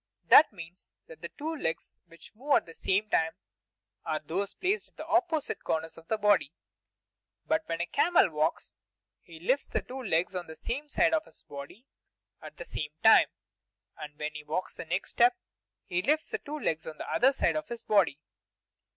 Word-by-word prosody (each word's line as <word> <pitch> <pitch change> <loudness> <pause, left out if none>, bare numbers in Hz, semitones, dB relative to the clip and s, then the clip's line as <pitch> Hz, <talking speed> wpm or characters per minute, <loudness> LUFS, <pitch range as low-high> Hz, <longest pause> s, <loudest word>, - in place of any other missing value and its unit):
That 300 - +9
means 175 -2 -12 0.2
that 160 0 -14
the 170 - -6
two 320 +2 -5
legs 165 - -3
which 165 +5 -14
move 275 +6 +1
at - - +2
the 165 - -12
same 195 +5 0
time 160 -5 +1 0.7
are 155 -1 -1
those 190 +6 -3
placed 390 +4 -1
at - - -29
the 310 - -6
opposite 335 -3 0
corners 160 0 -2
of 165 0 -16
his 220 - 0
body. 205 -8 +3 0.9
But 160 - +1
when 165 0 -1
a - - 0
camel 290 - +3
walks, 155 +1 -1 0.5
he 165 -1 -13
lifts 260 - +1
the - - -2
two 265 +1 -7
legs 180 -5 0
on 180 -1 -4
the 160 - -9
same 285 - -5
side 330 +2 +3
of 320 -1 +1
his - - -19
body 145 - -10 0.6
at - - -11
the - - -7
same 150 0 -5
time. 220 - +8 0.7
And 150 -1 -9
when 150 0 -4
he 150 0 -8
takes 155 +5 -3
the - - -8
next 180 +4 -2
step, 365 0 +4 0.5
he 180 0 -1
lifts 305 +7 0
the - - -2
two 300 +1 -6
legs 160 - -2
on 155 -1 -7
the - - -7
other 250 +4 +4
side 170 - +1
of 155 - -3
his 235 0 -7
body. 190 -9 +2
185 Hz, 195 wpm, -29 LUFS, -, 0.9 s, That